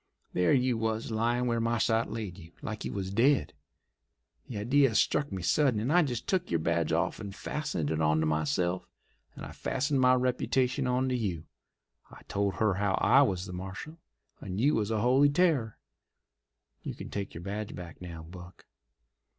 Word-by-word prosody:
There 90 Hz, -, +2 dB
you 125 Hz, -4 st, +2 dB
was 110 Hz, +1 st, -2 dB
lyin' 120 Hz, +3 st, +1 dB
where 120 Hz, -1 st, +1 dB
my 115 Hz, +1 st, +1 dB
shot 115 Hz, 0 st, +1 dB
laid 105 Hz, -5 st, -5 dB
you, 85 Hz, 0 st, -14 dB
like 110 Hz, -1 st, -5 dB
you -, -, -3 dB
was 95 Hz, -1 st, -4 dB
dead. 120 Hz, -, +2 dB, 0.9 s
The 115 Hz, -, -6 dB
idea 125 Hz, +3 st, +3 dB
struck 145 Hz, +5 st, +2 dB
me 95 Hz, -2 st, -4 dB
sudden, 135 Hz, -, +2 dB
and 125 Hz, +8 st, 0 dB
I 180 Hz, -, +6 dB
just 125 Hz, -7 st, -2 dB
took 185 Hz, -2 st, 0 dB
your 85 Hz, -, +1 dB
badge 85 Hz, 0 st, 0 dB
off -, -, 0 dB
and 100 Hz, -3 st, -7 dB
fastened 105 Hz, -, -3 dB
it 80 Hz, 0 st, -1 dB
onto 80 Hz, 0 st, +2 dB
myself, 80 Hz, +4 st, 0 dB, 0.5 s
and -, -, -8 dB
I -, -, -8 dB
fastened 140 Hz, +1 st, -1 dB
my 130 Hz, 0 st, +6 dB
reputation 130 Hz, +1 st, 0 dB
onto 130 Hz, +1 st, +1 dB
you. 100 Hz, -10 st, -2 dB, 0.7 s
I -, -, -14 dB
told 100 Hz, -1 st, -1 dB
her 100 Hz, -2 st, +1 dB
I 100 Hz, +7 st, +4 dB
was 95 Hz, -9 st, +1 dB
the 90 Hz, -, -8 dB
marshal 95 Hz, -, -7 dB, 0.4 s
and 95 Hz, 0 st, -5 dB
you 145 Hz, +6 st, +3 dB
was 105 Hz, -2 st, 0 dB
a 110 Hz, -2 st, 0 dB
holy 130 Hz, +5 st, +5 dB
terror. 145 Hz, -8 st, +1 dB, 1.0 s
You -, -, -6 dB
can -, -, -9 dB
take 100 Hz, -1 st, -4 dB
your 85 Hz, -, -7 dB
badge 105 Hz, +2 st, -4 dB
back 85 Hz, -1 st, -9 dB
now, 85 Hz, -3 st, -8 dB
Buck." 90 Hz, +2 st, -12 dB
110 Hz, 180 wpm, -29 LUFS, 90-130 Hz, 1.0 s, I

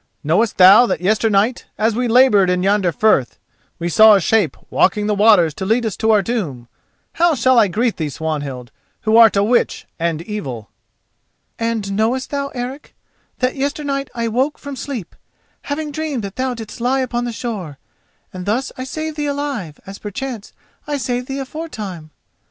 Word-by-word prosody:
Knowest 180 Hz, +9 st, +1 dB
thou 195 Hz, +6 st, +8 dB
that -, -, -1 dB
yesternight, 215 Hz, +3 st, +1 dB
as 220 Hz, +1 st, +1 dB
we 245 Hz, +2 st, -1 dB
laboured 225 Hz, -6 st, +5 dB
in 180 Hz, 0 st, 0 dB
yonder 195 Hz, -2 st, +2 dB
Firth, 165 Hz, -, +2 dB, 0.4 s
we 170 Hz, -, -3 dB
saw 215 Hz, +4 st, +7 dB
a -, -, +4 dB
shape 190 Hz, -4 st, +1 dB
walking 205 Hz, +2 st, +2 dB
the 210 Hz, -, +1 dB
waters 205 Hz, -6 st, +4 dB
to 190 Hz, -, -6 dB
lead 225 Hz, +5 st, +1 dB
us 215 Hz, -, -2 dB
to 220 Hz, -, 0 dB
our 210 Hz, -2 st, +4 dB
doom? 160 Hz, -, -3 dB, 0.5 s
How 340 Hz, -1 st, +3 dB
shall 255 Hz, 0 st, +4 dB
I 215 Hz, -, +5 dB
greet 225 Hz, +5 st, -1 dB
thee, 155 Hz, -3 st, -2 dB
Swanhild, 145 Hz, -5 st, -5 dB, 0.3 s
who 220 Hz, 0 st, +1 dB
art 225 Hz, -2 st, +7 dB
a 200 Hz, -, +3 dB
witch 240 Hz, +4 st, +1 dB
and 165 Hz, -1 st, -1 dB
evil?" 135 Hz, -, -6 dB, 0.9 s
"And 230 Hz, -3 st, -2 dB
knowest 235 Hz, +5 st, 0 dB
thou, 280 Hz, -1 st, -2 dB
Eric, 255 Hz, +5 st, -6 dB, 0.4 s
that 255 Hz, 0 st, 0 dB
yesternight 280 Hz, 0 st, -2 dB
I 230 Hz, -1 st, -1 dB
woke 260 Hz, +6 st, 0 dB
from 285 Hz, -1 st, -8 dB
sleep, 255 Hz, -, -6 dB, 0.5 s
having 295 Hz, +1 st, -3 dB
dreamed 290 Hz, -5 st, -3 dB
that 195 Hz, -1 st, -6 dB
thou 260 Hz, -1 st, -2 dB
didst 225 Hz, 0 st, -9 dB
lie 260 Hz, +2 st, +1 dB
upon 245 Hz, -1 st, -2 dB
the 240 Hz, -, -3 dB
shore, 205 Hz, -, -5 dB, 0.6 s
and 185 Hz, 0 st, -7 dB
thus 245 Hz, +6 st, -1 dB
I 255 Hz, -, -4 dB
saved 310 Hz, +3 st, -5 dB
thee 295 Hz, -1 st, -2 dB
alive, 280 Hz, -, -4 dB
as 195 Hz, +1 st, -9 dB
perchance 225 Hz, +1 st, -6 dB, 0.4 s
I 295 Hz, -, -3 dB
have 285 Hz, -, -2 dB
saved 245 Hz, 0 st, -2 dB
thee 270 Hz, -, -4 dB
aforetime? 240 Hz, -, -7 dB
225 Hz, 180 wpm, -18 LUFS, 195-260 Hz, 0.9 s, thou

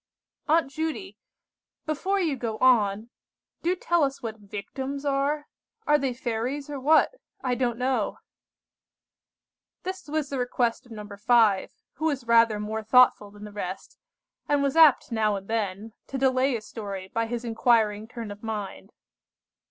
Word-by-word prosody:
"Aunt 315 Hz, -3 st, +3 dB
Judy, 320 Hz, +6 st, -4 dB, 0.7 s
before 370 Hz, +6 st, 0 dB
you 325 Hz, -7 st, +1 dB
go 230 Hz, -4 st, -4 dB
on, 220 Hz, -3 st, +3 dB, 0.5 s
do 350 Hz, +2 st, +1 dB
tell 345 Hz, -3 st, +1 dB
us 275 Hz, 0 st, -1 dB
what 220 Hz, -2 st, -6 dB
victims 260 Hz, +8 st, -6 dB
are? 285 Hz, +2 st, 0 dB, 0.4 s
Are 295 Hz, -5 st, +4 dB
they 270 Hz, -2 st, 0 dB
fairies, 250 Hz, +4 st, -3 dB
or 285 Hz, -, -4 dB
what? 310 Hz, -, +4 dB, 0.3 s
I 255 Hz, -, +1 dB
don't 245 Hz, -2 st, 0 dB
know." 250 Hz, -4 st, 0 dB, 1.7 s
This 375 Hz, -1 st, -6 dB
was 300 Hz, -1 st, -2 dB
the 275 Hz, -, -2 dB
request 245 Hz, 0 st, -1 dB
of -, -, -19 dB
No. 210 Hz, -1 st, -7 dB
5, 210 Hz, -1 st, +3 dB, 0.3 s
who 315 Hz, -, -2 dB
was 285 Hz, -5 st, 0 dB
rather 230 Hz, -2 st, +4 dB
more 215 Hz, +1 st, -3 dB
thoughtful 220 Hz, -2 st, +4 dB
than 205 Hz, +1 st, -13 dB
the 210 Hz, -, -8 dB
rest, 190 Hz, -2 st, -6 dB, 0.5 s
and 290 Hz, -1 st, +3 dB
was 275 Hz, +1 st, 0 dB
apt 315 Hz, -7 st, +6 dB
now 215 Hz, -2 st, +1 dB
and 195 Hz, 0 st, -7 dB
then 215 Hz, -1 st, -3 dB
to 270 Hz, -, -4 dB
delay 260 Hz, 0 st, +2 dB
a 225 Hz, -, -4 dB
story 200 Hz, -4 st, -7 dB
by 230 Hz, +3 st, -2 dB
his 240 Hz, +1 st, -4 dB
inquiring 220 Hz, -2 st, +2 dB
turn 230 Hz, -3 st, -7 dB
of 205 Hz, 0 st, -10 dB
mind. 210 Hz, -3 st, -5 dB
240 Hz, 155 wpm, -26 LUFS, 215-280 Hz, 1.7 s, apt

